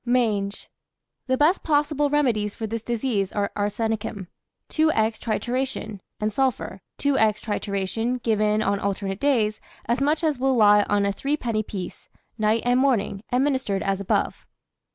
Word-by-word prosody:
MANGE. 220 -5 0 0.6
The 260 0 +2
best 310 +7 +3
possible 295 -1 +1
remedies 235 -8 +1
for 225 - -4
this 225 +1 -3
disease 225 -4 -1
are 205 -1 -1
arsenicum, 205 -1 -2 0.4
2^{×} 315 0 +2 0.3
trituration, 240 -2 -2 0.2
and 215 0 -1
sulphur, 265 -2 -1 0.2
2^{×} 285 -1 +1 0.3
trituration, 215 +3 -2
given 215 -1 +2
on 200 0 +1
alternate 195 0 -2
days, 225 -7 +1 0.2
as 235 +4 0
much 300 +4 +1
as 300 -5 +1
will 265 0 +2
lie 210 -2 +6
on 205 -1 +2
a 200 - +1
threepenny 240 -3 -1
piece, 195 -4 -7 0.3
night 220 0 +1
and 245 +1 +3
morning, 230 -7 +1
administered 260 -6 +1
as 195 0 -1
above. 195 - -1
225 Hz, 140 wpm, -24 LUFS, 205-265 Hz, 0.6 s, lie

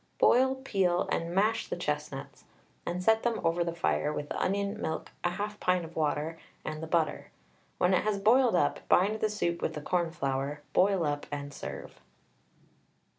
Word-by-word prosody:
Boil, 260 +2 +5
peel, 195 -9 +1
and 165 - -1
mash 210 +5 +2
the - - -3
chestnuts, - - -4 0.4
and 180 +1 -2
set 220 +3 +4
them 235 -1 0
over 165 +1 +2
the 170 0 -3
fire 150 -2 +1
with 150 -1 -4
the - - -2
onion, 200 +2 -1
milk, 160 - -3
1/2 205 +4 -2
pint 180 -2 +1
of 165 - -12
water, 155 +1 -1 0.3
and 155 0 -4
the 160 - -5
butter. 160 -1 0 0.5
When 180 +1 +3
it 185 - +4
has 210 -1 0
boiled 230 +3 +4
up, 145 -5 +2
bind 205 +4 +4
the 215 - +1
soup 170 -5 -1
with - - -1
the 150 - -4
cornflour, 145 -4 -1
boil 190 -3 +3
up, 145 0 -2
and 145 -1 -5
serve. - - -8
175 Hz, 175 wpm, -30 LUFS, 160-205 Hz, 0.5 s, Boil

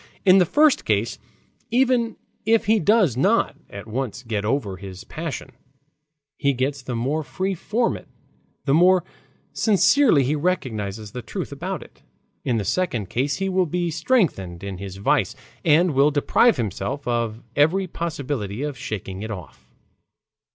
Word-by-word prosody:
In 190 0 +7
the 180 - +4
first 300 - +4
case - - 0 0.5
even 245 -1 +2 0.3
if 225 +1 +3
he 220 +1 +4
does 200 - +3
not 130 - +2
at 100 +1 -8
once 120 0 -4
get 110 -4 -2
over 105 -4 -1
his 95 -1 -9
passion, 155 -4 -6 0.9
he 140 -1 +2
gets 135 +2 -1
the 125 -1 -4
more 135 +7 0
free 185 +8 -2
from 225 +6 0
it - - -11 0.6
the 135 - +2
more 180 +3 +5 0.5
sincerely 200 - +4
he 140 +4 +1
recognizes 110 - -2
the 125 - -6
truth - - -5
about - - -4
it; - - -20 0.4
in 120 - 0
the 105 - -2
second 125 - -1
case 135 +3 0
he 195 0 -2
will 185 -1 +1
be 175 +1 -1
strengthened 155 - 0
in 100 -2 -5
his 95 -1 -7
vice 130 +2 +1 0.3
and 165 +1 +4
will 140 +2 +5
deprive 150 - +3
himself 120 +6 -3
of 115 -1 -1
every 160 +7 +3
possibility 140 - -4
of 145 -4 -4
shaking 95 -2 -5
it 110 - -5
off. 90 -9 -9
140 Hz, 155 wpm, -23 LUFS, 110-185 Hz, 0.9 s, In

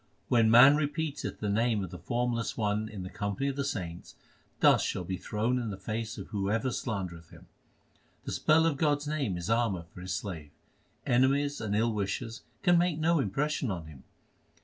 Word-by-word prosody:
When 115 -2 +4
man 130 +6 +8
repeateth 155 0 -3
the 105 - -1
name 110 0 +1
of 90 - -6
the 90 - -8
Formless 120 +4 -1
One 105 0 0
in 100 -3 -7
the 90 - -6
company 100 +6 -2
of 135 - -3
the 140 - -1
saints, 90 -11 -5 0.4
Dust - - +5
shall - - -3
be 95 +2 -4
thrown 110 +7 -1
in 115 -3 -3
the 100 - -5
face 110 +3 -4
of - - -8
whoever 105 +5 -1
slandereth 90 -10 -4
him. - - -15 0.8
The - - -4
spell 160 +1 +3
of 160 -4 +1
God 145 0 +3
s 145 - -9
name 145 -9 -1
2 - - -4
is 85 +4 -5
armour 115 -7 +1
for 90 - -10
His 90 -1 -3
slave: 85 -7 -6 0.6
Enemies 140 +2 +2
and 105 -2 -1
ill 115 +2 +2
wishers 105 +4 -3 0.2
can 175 -2 +5
make 175 -3 +1
no 165 +1 +2
impression 135 +3 -1
on 85 -5 -4
him. 75 -4 -13
115 Hz, 195 wpm, -30 LUFS, 95-140 Hz, 0.8 s, man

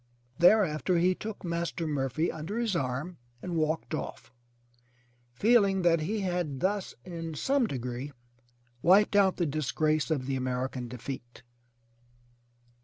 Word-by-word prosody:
Thereafter 180 -2 +4
he 180 +2 +3
took 210 +1 -7
Master 170 0 -2
Murphy 145 +1 -1
under 160 +7 -5
his 230 -5 0
arm 140 +4 -3 0.2
and 175 +5 -5
walked 160 0 -1
off, 130 -5 -5 1.0
feeling 200 - +4
that 170 -1 +4
he 205 +7 -2
had 175 -7 -2
thus 195 +3 -1
in 165 -3 -6
some 270 - +1
degree 125 - -4 0.7
wiped 200 +4 +5
out 195 -2 +4
the 175 - +1
disgrace 155 +1 0
of 145 -5 0
the 135 0 -1
American 130 -1 -2
defeat! 125 0 -8
165 Hz, 125 wpm, -29 LUFS, 135-185 Hz, 1.0 s, wiped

